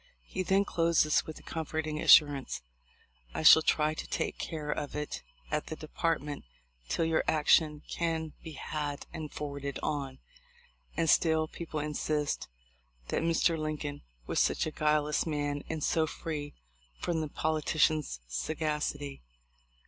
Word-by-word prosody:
He 185 Hz, -, -4 dB
then 195 Hz, +2 st, +3 dB
closes 165 Hz, -4 st, +2 dB
with 155 Hz, -, -6 dB
the -, -, -13 dB
comforting 155 Hz, -1 st, -3 dB
assurance: 145 Hz, -, +5 dB, 0.7 s
"I -, -, -2 dB
shall 160 Hz, +1 st, +10 dB
try 155 Hz, 0 st, +2 dB
to -, -, -6 dB
take -, -, -2 dB
care 150 Hz, -2 st, -3 dB
of 145 Hz, -1 st, -3 dB
it 150 Hz, 0 st, -3 dB, 0.3 s
at 150 Hz, 0 st, -1 dB
the 160 Hz, -, -4 dB
Department 155 Hz, -2 st, -2 dB, 0.5 s
till 165 Hz, -, +1 dB
your 160 Hz, 0 st, +2 dB
action 150 Hz, 0 st, +3 dB
can 160 Hz, -2 st, -2 dB
be 160 Hz, -, -7 dB
had 145 Hz, 0 st, -4 dB
and 155 Hz, -3 st, -5 dB
forwarded 140 Hz, -2 st, -4 dB
on." 135 Hz, -3 st, -2 dB, 0.8 s
And 165 Hz, -, +2 dB
still 160 Hz, 0 st, +4 dB
people 160 Hz, -1 st, -5 dB
insist 150 Hz, 0 st, -1 dB, 0.6 s
that -, -, 0 dB
Mr. 165 Hz, 0 st, +3 dB
Lincoln 150 Hz, -2 st, -3 dB, 0.2 s
was -, -, 0 dB
such -, -, +2 dB
a 155 Hz, -, -3 dB
guileless 150 Hz, 0 st, +1 dB
man 145 Hz, -2 st, -1 dB
and 160 Hz, -2 st, -3 dB
so 160 Hz, -1 st, +2 dB
free 150 Hz, -2 st, -5 dB, 0.4 s
from 165 Hz, -2 st, -1 dB
the 155 Hz, -, -3 dB
politician's 155 Hz, -, +1 dB
sagacity 145 Hz, -, -2 dB
155 Hz, 140 wpm, -31 LUFS, 145-160 Hz, 0.8 s, shall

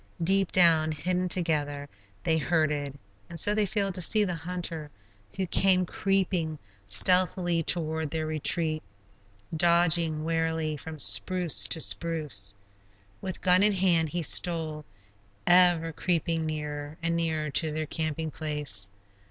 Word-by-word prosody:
Deep 195 Hz, +2 st, +2 dB
down, 165 Hz, -3 st, +4 dB
hidden 180 Hz, +4 st, -2 dB
together, 150 Hz, -5 st, 0 dB, 0.4 s
they 165 Hz, -2 st, +1 dB
herded, 150 Hz, -4 st, -1 dB, 0.3 s
and 170 Hz, -, 0 dB
so 205 Hz, -, +5 dB
they 210 Hz, -1 st, +1 dB
failed 195 Hz, -1 st, -2 dB
to 180 Hz, -, -3 dB
see 210 Hz, +5 st, +3 dB
the 180 Hz, -3 st, -2 dB
hunter 165 Hz, -2 st, -5 dB, 0.5 s
who 190 Hz, -, -2 dB
came 185 Hz, +1 st, +3 dB
creeping 180 Hz, -4 st, -1 dB, 0.3 s
stealthily 175 Hz, -, +3 dB
toward 160 Hz, -1 st, -1 dB
their 160 Hz, +1 st, -3 dB
retreat, 155 Hz, +1 st, -1 dB, 0.7 s
dodging 170 Hz, -2 st, +2 dB
warily 160 Hz, -1 st, -1 dB
from 155 Hz, +2 st, -9 dB
spruce 150 Hz, -, +2 dB
to 165 Hz, -, +1 dB
spruce. 150 Hz, -14 st, -2 dB, 0.7 s
With 185 Hz, -2 st, -6 dB
gun 180 Hz, 0 st, +4 dB
in 210 Hz, 0 st, +4 dB
hand 175 Hz, -4 st, +2 dB
he 175 Hz, +2 st, -3 dB
stole, 160 Hz, -1 st, +1 dB, 0.6 s
ever 175 Hz, -2 st, +4 dB
creeping 165 Hz, -1 st, -1 dB
nearer 150 Hz, -1 st, -5 dB
and 170 Hz, 0 st, 0 dB
nearer 160 Hz, -2 st, -1 dB
to 160 Hz, +3 st, 0 dB
their 155 Hz, +1 st, -3 dB
camping 155 Hz, 0 st, -3 dB
place. 145 Hz, -12 st, -4 dB
165 Hz, 130 wpm, -27 LUFS, 155-180 Hz, 0.7 s, so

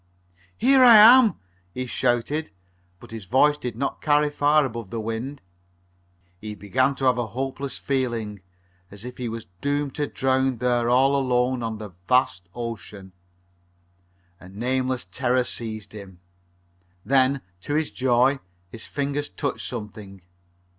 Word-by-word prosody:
"Here 265 Hz, +2 st, +5 dB
I 240 Hz, -2 st, +9 dB
am!" 230 Hz, +1 st, +8 dB, 0.4 s
he 130 Hz, 0 st, -3 dB
shouted, 125 Hz, +5 st, -1 dB, 0.5 s
but -, -, -14 dB
his 110 Hz, -3 st, -7 dB
voice 145 Hz, +8 st, +3 dB
did 125 Hz, -6 st, -6 dB
not 140 Hz, +4 st, -3 dB
carry 150 Hz, -1 st, +2 dB
far 145 Hz, 0 st, +3 dB
above 115 Hz, -5 st, -6 dB
the 115 Hz, -, -4 dB
wind. 115 Hz, +6 st, -5 dB, 1.0 s
He 105 Hz, +1 st, -7 dB
began 130 Hz, +7 st, 0 dB
to 135 Hz, -, -3 dB
have 125 Hz, -1 st, +3 dB
a 120 Hz, -, -2 dB
hopeless 135 Hz, +3 st, -5 dB
feeling, 115 Hz, -7 st, -2 dB, 0.5 s
as 100 Hz, +3 st, -11 dB
if 125 Hz, -, -8 dB
he 125 Hz, -2 st, -4 dB
was 115 Hz, 0 st, -6 dB, 0.2 s
doomed 145 Hz, -1 st, -1 dB
to 145 Hz, -, -2 dB
drown 130 Hz, -1 st, 0 dB
there 120 Hz, 0 st, +1 dB
all 135 Hz, +3 st, +4 dB
alone 125 Hz, -1 st, +1 dB
on 115 Hz, -1 st, -3 dB
the 105 Hz, -2 st, -8 dB, 0.2 s
vast 95 Hz, -9 st, +1 dB
ocean. 105 Hz, -5 st, -7 dB, 1.3 s
A 90 Hz, -, -13 dB
nameless 125 Hz, +3 st, -2 dB
terror 120 Hz, +8 st, 0 dB
seized 110 Hz, -4 st, -6 dB
him. 95 Hz, -4 st, -11 dB, 0.9 s
Then, 135 Hz, 0 st, +2 dB, 0.2 s
to 145 Hz, +10 st, -3 dB
his 155 Hz, 0 st, 0 dB
joy, 130 Hz, +2 st, +2 dB, 0.3 s
his 115 Hz, -, -9 dB
fingers 145 Hz, +1 st, -3 dB
touched 140 Hz, -3 st, -4 dB
something. 105 Hz, -5 st, -8 dB
125 Hz, 140 wpm, -24 LUFS, 110-140 Hz, 1.3 s, I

